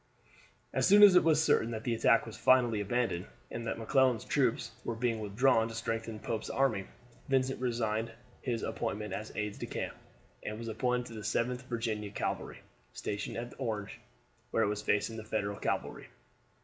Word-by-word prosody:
As -, -, +2 dB
soon 205 Hz, +1 st, +8 dB
as 200 Hz, -2 st, +10 dB
it 180 Hz, -, +7 dB
was 160 Hz, -1 st, +4 dB
certain 145 Hz, -7 st, +3 dB
that 110 Hz, -1 st, -4 dB
the 120 Hz, -, 0 dB
attack 115 Hz, 0 st, +4 dB
was 115 Hz, -, -8 dB
finally 120 Hz, -5 st, +4 dB
abandoned, 105 Hz, -4 st, -1 dB, 0.2 s
and 115 Hz, 0 st, -4 dB
that -, -, -2 dB
McClellan's 125 Hz, +1 st, +2 dB
troops 125 Hz, -2 st, +1 dB
were 115 Hz, -, -3 dB
being 115 Hz, -1 st, 0 dB
withdrawn 115 Hz, +3 st, +3 dB
to 115 Hz, -, -7 dB
strengthen 115 Hz, -1 st, -3 dB
Pope's 110 Hz, +1 st, -4 dB
army, 130 Hz, -8 st, +1 dB, 0.4 s
Vincent 130 Hz, -1 st, +1 dB
resigned 115 Hz, -2 st, -1 dB, 0.3 s
his 120 Hz, -3 st, -2 dB
appointment 105 Hz, -3 st, -3 dB
as 110 Hz, +3 st, -5 dB
aide 105 Hz, -1 st, -3 dB
de -, -, -4 dB
camp, -, -, -4 dB, 0.5 s
and 105 Hz, -, -5 dB
was 115 Hz, 0 st, -5 dB
appointed 125 Hz, +2 st, 0 dB
to -, -, -9 dB
the 110 Hz, -, -6 dB
7th 120 Hz, +4 st, 0 dB
Virginian 110 Hz, -4 st, -3 dB
Cavalry, -, -, -3 dB, 0.3 s
stationed 105 Hz, 0 st, -4 dB
at 120 Hz, +1 st, -5 dB
Orange, 110 Hz, -6 st, -3 dB, 0.5 s
where 115 Hz, -, +2 dB
it 100 Hz, -, +2 dB
was 105 Hz, 0 st, -2 dB
facing 105 Hz, +3 st, 0 dB
the 110 Hz, -, -6 dB
Federal 105 Hz, -2 st, -2 dB
cavalry. -, -, -2 dB
115 Hz, 175 wpm, -32 LUFS, 110-125 Hz, 0.5 s, as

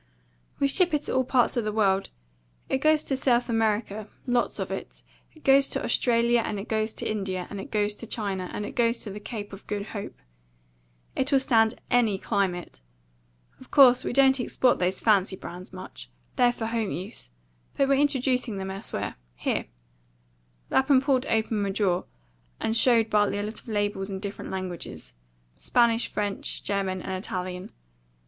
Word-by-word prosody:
"We 280 Hz, -, +3 dB
ship 340 Hz, +3 st, +3 dB
it 295 Hz, -, -1 dB
to -, -, -2 dB
all 260 Hz, -, +3 dB
parts 250 Hz, -1 st, +2 dB
of 240 Hz, -, +1 dB
the 215 Hz, -, -1 dB
world. 195 Hz, -3 st, +2 dB, 0.6 s
It 265 Hz, -, +1 dB
goes 310 Hz, +1 st, +3 dB
to 270 Hz, -, -1 dB
South 245 Hz, -2 st, +2 dB
America, 215 Hz, -2 st, 0 dB, 0.2 s
lots 245 Hz, -1 st, +1 dB
of -, -, -3 dB
it. -, -, -6 dB, 0.3 s
It 315 Hz, -, -18 dB
goes 275 Hz, 0 st, +5 dB
to -, -, -2 dB
Australia, 235 Hz, -1 st, +2 dB
and 210 Hz, -, -3 dB
it 195 Hz, -, -7 dB
goes 220 Hz, 0 st, 0 dB
to -, -, -5 dB
India, 195 Hz, -4 st, -2 dB
and 200 Hz, -1 st, -5 dB
it -, -, -9 dB
goes 210 Hz, -1 st, +1 dB
to 225 Hz, +2 st, -9 dB
China, 195 Hz, -5 st, -3 dB
and 210 Hz, -, -4 dB
it -, -, -8 dB
goes 235 Hz, -1 st, +3 dB
to 210 Hz, -, -4 dB
the 205 Hz, -, -7 dB
Cape 205 Hz, -2 st, -7 dB
of 195 Hz, -, -11 dB
Good 205 Hz, 0 st, -3 dB
Hope. 200 Hz, -, -6 dB, 1.0 s
It'll 270 Hz, +1 st, +2 dB
stand 225 Hz, -4 st, +2 dB
any 230 Hz, -5 st, +3 dB
climate. 190 Hz, -, -2 dB, 0.8 s
Of 260 Hz, -, -15 dB
course, 255 Hz, -3 st, +7 dB
we -, -, -2 dB
don't 265 Hz, +1 st, +4 dB
export 250 Hz, +1 st, +2 dB
these 185 Hz, +1 st, 0 dB
fancy 200 Hz, -3 st, +3 dB
brands 180 Hz, 0 st, -9 dB
much. -, -, -10 dB, 0.3 s
They're 245 Hz, -1 st, +4 dB
for 235 Hz, -2 st, -5 dB
home 225 Hz, -2 st, -1 dB
use. 185 Hz, -, -7 dB, 0.5 s
But 275 Hz, -, +3 dB
we're 275 Hz, 0 st, +3 dB
introducing 255 Hz, -6 st, +1 dB
them 190 Hz, 0 st, -4 dB
elsewhere. 195 Hz, +3 st, -5 dB, 0.2 s
Here." -, -, -2 dB, 1.0 s
Lapham 265 Hz, 0 st, +4 dB
pulled 270 Hz, -1 st, +1 dB
open 220 Hz, -1 st, +1 dB
a 200 Hz, -, -1 dB
drawer, 190 Hz, -3 st, 0 dB, 0.5 s
and 220 Hz, -, -1 dB
showed 230 Hz, -2 st, +4 dB
Bartley 205 Hz, -1 st, +2 dB
a 205 Hz, -, -2 dB
lot 215 Hz, +2 st, -5 dB
of -, -, -22 dB
labels 205 Hz, -2 st, -1 dB
in 190 Hz, -1 st, -4 dB
different 200 Hz, 0 st, -6 dB
languages 180 Hz, -, -6 dB, 0.4 s
Spanish, 235 Hz, -1 st, +2 dB
French, 205 Hz, -1 st, -3 dB
German, 190 Hz, -2 st, -1 dB
and 190 Hz, 0 st, -4 dB
Italian. 180 Hz, -1 st, -5 dB
215 Hz, 175 wpm, -26 LUFS, 195-245 Hz, 1.0 s, course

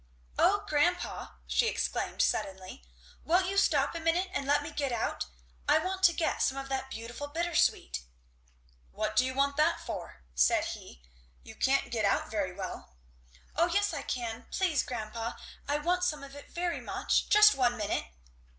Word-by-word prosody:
"O 410 Hz, +2 st, +4 dB
grandpa," 350 Hz, +3 st, 0 dB
she 465 Hz, -, +2 dB
exclaimed -, -, 0 dB
suddenly, 190 Hz, -, -2 dB, 0.4 s
"won't 360 Hz, +3 st, +3 dB
you 385 Hz, +2 st, -2 dB
stop 295 Hz, -8 st, +3 dB
a 335 Hz, -, -4 dB
minute 340 Hz, +3 st, +1 dB
and 275 Hz, -, -2 dB
let 290 Hz, +1 st, +3 dB
me 300 Hz, -, -6 dB
get 280 Hz, -3 st, -2 dB
out. 230 Hz, -, -2 dB, 0.4 s
I -, -, +7 dB
want 375 Hz, +1 st, -2 dB
to 345 Hz, -, +7 dB
get 330 Hz, -, -1 dB
some 265 Hz, -, +1 dB
of 270 Hz, 0 st, -5 dB
that 265 Hz, 0 st, -2 dB
beautiful 240 Hz, +4 st, -6 dB
bittersweet." 330 Hz, -, +1 dB, 0.9 s
"What 215 Hz, -, -3 dB
do 255 Hz, -, +5 dB
you 260 Hz, 0 st, -2 dB
want 280 Hz, +1 st, +1 dB
that 305 Hz, -, +3 dB
for?" 65 Hz, -, -7 dB
said 65 Hz, 0 st, +3 dB
he. -, -, -8 dB, 0.4 s
"You -, -, -11 dB
can't -, -, +1 dB
get -, -, 0 dB
out -, -, +1 dB
very -, -, -1 dB
well." 60 Hz, -, -7 dB, 0.6 s
"O 335 Hz, +3 st, +4 dB
yes 405 Hz, +2 st, +1 dB
I 290 Hz, -, -3 dB
can 235 Hz, -3 st, -4 dB
please, 350 Hz, -7 st, +1 dB
grandpa! 230 Hz, -1 st, -4 dB, 0.3 s
I 290 Hz, -, +1 dB
want 355 Hz, +4 st, 0 dB
some 305 Hz, -5 st, 0 dB
of 280 Hz, 0 st, -10 dB
it 285 Hz, -, -11 dB
very 345 Hz, 0 st, -2 dB
much -, -, 0 dB
just 425 Hz, 0 st, +8 dB
one 245 Hz, -2 st, +2 dB
minute!" 210 Hz, -1 st, -1 dB
290 Hz, 175 wpm, -30 LUFS, 245-345 Hz, 0.9 s, just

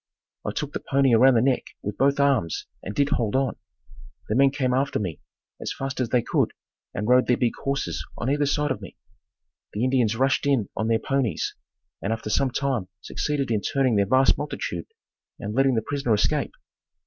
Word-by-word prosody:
I -, -, -2 dB
took -, -, -4 dB
the -, -, -2 dB
pony 135 Hz, -2 st, +2 dB
around 130 Hz, +3 st, +6 dB
the 115 Hz, -, +4 dB
neck 130 Hz, -1 st, 0 dB
with 105 Hz, 0 st, -3 dB
both 140 Hz, +1 st, +3 dB
arms 135 Hz, -, +1 dB, 0.2 s
and 100 Hz, -, -6 dB
did 140 Hz, 0 st, +2 dB
hold 115 Hz, -6 st, 0 dB
on. 135 Hz, -1 st, +1 dB, 0.7 s
The 105 Hz, -, +1 dB
men 135 Hz, +2 st, +6 dB
came 130 Hz, -2 st, 0 dB
after 135 Hz, +2 st, +1 dB
me 90 Hz, -7 st, -3 dB, 0.4 s
as -, -, -3 dB
fast 135 Hz, -1 st, -4 dB
as 125 Hz, -3 st, 0 dB
they 120 Hz, -1 st, +2 dB
could -, -, +1 dB, 0.4 s
and 105 Hz, -, -3 dB
rode 125 Hz, +1 st, +5 dB
their 125 Hz, -, +3 dB
big 120 Hz, -2 st, +1 dB
horses 140 Hz, 0 st, -2 dB
on 120 Hz, -, -3 dB
either 145 Hz, +1 st, +2 dB
side 145 Hz, 0 st, +1 dB
of 130 Hz, -, -3 dB
me. -, -, -10 dB, 0.8 s
The 105 Hz, -, -1 dB
Indians 125 Hz, -4 st, +2 dB
rushed 135 Hz, +3 st, +1 dB
in 130 Hz, -8 st, +2 dB
on 110 Hz, -, -1 dB
their 115 Hz, 0 st, +3 dB
ponies 135 Hz, -2 st, -1 dB, 0.5 s
and 100 Hz, -, -2 dB
after 110 Hz, -1 st, -3 dB
some 130 Hz, +5 st, +2 dB
time 130 Hz, -6 st, -1 dB
succeeded 140 Hz, +3 st, -2 dB
in 110 Hz, -2 st, +1 dB
turning 135 Hz, -3 st, +1 dB
that 100 Hz, -1 st, +2 dB
vast 130 Hz, 0 st, +4 dB
multitude -, -, -4 dB, 0.5 s
and 105 Hz, +1 st, -5 dB
letting 135 Hz, +1 st, +3 dB
the 110 Hz, -, 0 dB
prisoner 140 Hz, -4 st, 0 dB
escape. 105 Hz, -, 0 dB
130 Hz, 195 wpm, -25 LUFS, 110-140 Hz, 0.8 s, around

